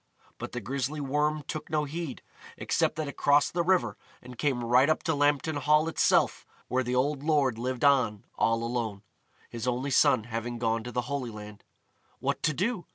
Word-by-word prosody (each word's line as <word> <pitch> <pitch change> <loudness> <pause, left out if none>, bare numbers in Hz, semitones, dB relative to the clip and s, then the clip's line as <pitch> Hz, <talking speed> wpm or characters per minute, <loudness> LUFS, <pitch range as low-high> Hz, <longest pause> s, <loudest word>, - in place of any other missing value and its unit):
But - - -6
the 125 - -4
grisly 135 +6 -3
Worm 150 +2 0
took 155 - -5
no 155 -1 +1
heed, 150 -1 -5 0.3
except - - 0
that 155 -1 -3
it 140 - -7
crossed 145 0 +3
the 175 - +1
river 180 +1 +1 0.2
and 125 0 -12
came 125 -1 -1
right 125 +5 +4
up 155 - +1
to 160 - +1
Lambton 145 +1 +1
Hall 150 +2 +3
itself 165 - +2 0.3
where 130 +1 +1
the 125 0 -2
old 140 +2 +1
lord 145 -6 +1
lived 130 +2 -1
on 125 -8 +3
all 115 0 +1
alone, 115 -4 -3 0.5
his 115 +1 -5
only 125 +3 -1
son 110 - +4
having 115 +1 -4
gone 115 -1 0
to 125 - -5
the 125 - -1
Holy 130 0 -3
Land. 105 -1 -10 0.5
What - - -2
to - - +2
do? 205 - -1
135 Hz, 190 wpm, -28 LUFS, 120-150 Hz, 0.5 s, right